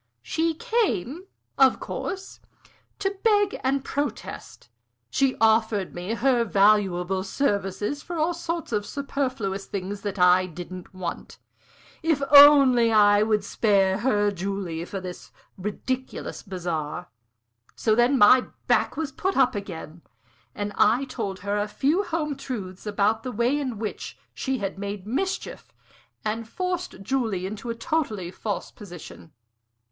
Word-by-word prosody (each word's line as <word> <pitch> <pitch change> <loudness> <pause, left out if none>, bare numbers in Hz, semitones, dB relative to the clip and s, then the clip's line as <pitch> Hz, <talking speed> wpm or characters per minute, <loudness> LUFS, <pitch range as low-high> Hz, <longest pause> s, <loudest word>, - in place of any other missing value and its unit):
"She 325 0 0
came, 385 - -1 0.3
of 265 -1 +5
course, 385 0 -5 0.6
to 400 0 -2
beg 410 -3 +2
and 270 +1 0
protest. 290 +1 -5 0.4
She 270 -1 +2
offered 220 -3 +2
me 180 +6 -3
her 245 -1 +2
valuable 195 -3 +2
services 205 +3 -1
for 345 - -6
all 320 +3 +1
sorts 335 -2 -4
of 210 -2 0
superfluous 255 -7 -3
things 200 +1 -5
that 205 -1 -4
I 180 0 +5
didn't 180 +1 -9
want 185 -3 -6 0.6
if 315 -4 +1
only 275 -5 +8
I 205 -1 +5
would 215 -1 +2
spare 195 -2 +2
her 205 -4 +2
Julie 190 -3 -4
for 195 - -5
this 180 -1 -9 0.2
ridiculous 250 +7 -4
bazaar. 175 -3 -4 0.7
So 220 - +1
then 240 +4 +4
my 250 +3 +6 0.2
back - - +2
was 310 -3 -2
put 380 +7 -2
up 265 -2 +4
again, 175 -5 -7 0.5
and 205 0 -3
I 240 +6 +4
told 205 -8 -5
her 205 +1 -1
a 205 - -1
few 280 - +1
home 320 -6 -2
truths 210 -8 -6
about 210 +2 +1
the 255 - -5
way 240 +4 +1
in 255 -6 -3
which 215 0 -5 0.2
she 265 -1 -2
had 195 -3 -4
made 200 -1 -5
mischief 280 - -3 0.5
and 220 +1 -3
forced 360 - -4
Julie 220 -6 -1
into 215 +4 -6
a 230 - -2
totally 230 - -2
false 205 +2 -4
position. 175 -4 -11
215 Hz, 135 wpm, -25 LUFS, 195-275 Hz, 0.7 s, only